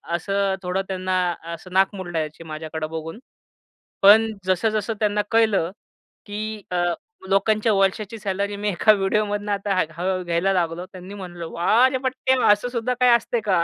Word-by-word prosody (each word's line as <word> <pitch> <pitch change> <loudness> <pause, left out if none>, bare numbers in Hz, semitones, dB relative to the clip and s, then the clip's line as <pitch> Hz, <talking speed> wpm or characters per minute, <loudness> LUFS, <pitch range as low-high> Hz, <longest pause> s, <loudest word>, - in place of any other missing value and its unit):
असं 195 +2 0
थोडं 180 +2 -1
त्यांना 185 -1 -1 0.4
असं 180 +2 -10
नाक 195 +2 +3
मुरडायचे 165 -4 -4
माझ्याकडं 155 0 -5
बघून. 165 +6 -6 0.8
पण 220 +3 +7
जसं-जसं 215 +4 0
त्यांना 210 -1 +1
कळलं, 215 -6 +3 0.5
की 215 0 -5
अ, 175 -1 +1 0.5
लोकांच्या 215 +3 +2
वर्षाची 195 +3 0
सॅलरी 200 0 -2
मी 205 0 -1
एका 205 +3 +4
व्हिडिओमधनं 205 +1 0
आता 200 0 -1
हळूहळू 185 +2 -1
घ्यायला 175 +3 +1
लागलो. 175 0 -1
त्यांनी 185 +1 -10
म्हंटलं, 175 -4 -7
वाह 225 +9 +4
रे 260 - -1
पठ्या! 260 0 +1
असं 210 +4 +2
सुद्धा 245 +1 -1
काही 250 -1 +5
असते 235 0 -1
का? 185 -4 +3
195 Hz, 150 wpm, -23 LUFS, 180-215 Hz, 0.8 s, पण